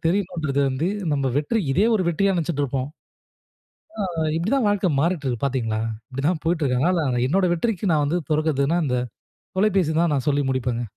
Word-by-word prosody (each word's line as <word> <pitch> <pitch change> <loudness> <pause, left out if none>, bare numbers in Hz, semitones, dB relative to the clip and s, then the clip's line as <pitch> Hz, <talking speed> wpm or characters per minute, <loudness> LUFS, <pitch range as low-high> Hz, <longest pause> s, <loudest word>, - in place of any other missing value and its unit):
தெரியணும்ன்றது 170 -6 0
வந்து 135 +5 -1 0.3
நம்ம 140 -2 0
வெற்றி 150 +10 +1
இதே 195 +10 +3
ஒரு 205 - +2
வெற்றியா 195 +4 +2
நினச்சிட்டு 160 -3 -1
இருப்போம். 130 0 -2 1.2
ஆ - - -4 0.3
இப்பிடிதான் 215 +9 +1
வாழ்க்கை 205 -2 +1
மாறிட்டு 165 -1 0
இருக்கு 120 -1 -2
பார்த்தீங்களா! 115 -5 -1 0.3
இப்பிடிதான் 145 +5 -1
போயிட்டு 165 -1 +1
இருக்காங்க, 130 +4 +2 0.2
ஆனா 125 -1 0
என்னோட 185 +4 +2
வெற்றிக்கு 195 +1 -1
நான் 150 -1 +2
வந்து 170 +5 0
பொறுப்பேத்தக்குறதுன்னா 155 +1 +1
இந்த 125 -2 0 0.6
தொலைபேசி 190 -5 +2
தான் 170 -3 +2
நான் 135 0 -2
சொல்லி 145 0 +1
முடிப்பேங்க. 125 -2 -1
155 Hz, 165 wpm, -23 LUFS, 135-180 Hz, 1.2 s, இதே